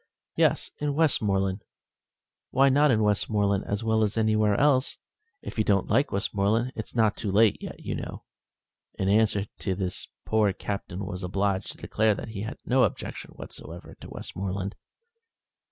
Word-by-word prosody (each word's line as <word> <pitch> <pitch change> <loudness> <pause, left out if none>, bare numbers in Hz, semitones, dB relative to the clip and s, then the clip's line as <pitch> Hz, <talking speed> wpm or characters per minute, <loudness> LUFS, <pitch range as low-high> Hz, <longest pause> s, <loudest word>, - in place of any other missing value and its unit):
"Yes, - - +2
in 145 -1 -1
Westmoreland. 100 -10 +1 0.9
Why 135 +1 +4
not 145 +3 +4
in 110 -4 +3
Westmoreland 105 -1 +1
as 105 +2 -2
well 110 -1 +2
as 105 +1 -1
anywhere 110 -2 +3
else? 140 -2 +3 0.5
If - - -6
you - - +4
don't 100 -2 +1
like 140 - +3
Westmoreland, 105 +4 0
it's 110 - -6
not 110 -3 +3
too 105 -4 -3
late 105 +1 +4
yet, - - -7
you - - -3
know." - - -6 0.7
In 95 - -1
answer 105 -1 +3
to 95 - -1
this 90 -1 -3
the - - -34 0.2
poor 105 -3 +3
Captain 100 -1 -5
was 90 -1 -5
obliged 95 +1 -1
to - - -19
declare 110 -1 +1
that 110 - -7
he 105 -3 -5
had 110 +4 -5
no 130 +1 +4
objection 110 - -3
whatever 85 +3 -9
to - - -9
Westmoreland. 95 +1 -4
105 Hz, 165 wpm, -27 LUFS, 100-115 Hz, 0.9 s, Why